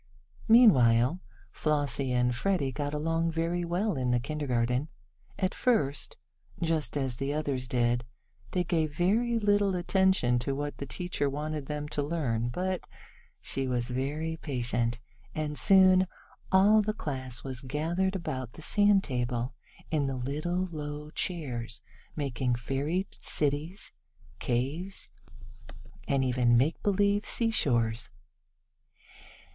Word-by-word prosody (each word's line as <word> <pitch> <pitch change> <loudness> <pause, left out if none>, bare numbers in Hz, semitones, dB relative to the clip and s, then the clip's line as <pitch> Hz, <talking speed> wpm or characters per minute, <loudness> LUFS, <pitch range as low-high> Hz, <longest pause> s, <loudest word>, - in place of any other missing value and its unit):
Meanwhile 135 - +6 0.3
Flossie 145 -3 0
and 125 0 +2
Freddie 160 -2 0
got 145 +2 -3
along 165 +2 0
very 165 +2 -1
well 175 +1 0
in 125 -1 -1
the 120 0 +3
kindergarten. 125 -1 -1 0.5
At 185 -1 0
first, 150 - 0 0.4
just 160 -3 0
as 130 -4 -1
the 135 +2 -2
others 140 -4 -1
did, 120 -1 +1 0.5
they 180 - 0
gave 160 -3 -1
very 230 +7 +2
little 205 -3 +2
attention 180 -9 +2
to 135 +3 -2
what 145 +1 -4
the 140 - -5
teacher 145 +1 -1
wanted 150 0 -4
them 150 0 -3
to 150 - -1
learn, 135 -7 -1
but 185 +7 -2 0.5
she 135 -1 -1
was 125 -1 -1
very 150 +6 -2
patient, 120 -4 -1 0.4
and 150 -1 -2
soon 185 +1 +6 0.4
all 205 +3 +6
the 215 +1 -2
class 130 - -4
was 130 -2 -5
gathered 165 +8 -1
about 130 -9 -4
the 160 - -10
sand 205 0 +4
table, 125 -2 -2 0.4
in 150 -3 +1
the 135 - -2
little 155 +8 -2
low 150 -1 -6
chairs, 125 -11 -3 0.4
making 130 -4 -1
fairy 140 +9 -1
cities, 150 +6 -1 0.5
caves, 140 +10 -2 1.0
and 135 -1 +2
even 120 -2 +3
makebelieve 200 - +2
seashore 140 - +2
places. 125 +3 -5
150 Hz, 125 wpm, -29 LUFS, 125-175 Hz, 1.0 s, Meanwhile